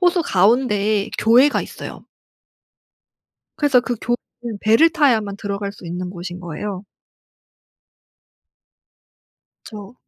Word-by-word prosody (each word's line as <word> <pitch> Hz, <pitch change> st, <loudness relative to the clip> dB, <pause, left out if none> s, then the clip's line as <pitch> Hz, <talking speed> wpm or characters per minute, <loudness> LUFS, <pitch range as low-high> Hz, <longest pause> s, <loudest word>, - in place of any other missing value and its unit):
호수 355 Hz, -1 st, +3 dB
가운데에 210 Hz, -, +2 dB
교회가 250 Hz, +6 st, +4 dB
있어요. -, -, -9 dB, 1.5 s
그래서 275 Hz, -4 st, +4 dB
그 245 Hz, 0 st, -3 dB
교회는 240 Hz, -2 st, -5 dB
배를 225 Hz, +10 st, +5 dB
타야만 225 Hz, -11 st, +1 dB
들어갈 200 Hz, 0 st, -4 dB
수 185 Hz, -, -13 dB
있는 180 Hz, +1 st, -5 dB
곳인 175 Hz, 0 st, -7 dB
거예요. 185 Hz, +4 st, -6 dB, 2.8 s
그쵸. 210 Hz, +1 st, -10 dB
210 Hz, 220 characters per minute, -20 LUFS, 195-245 Hz, 2.8 s, 배를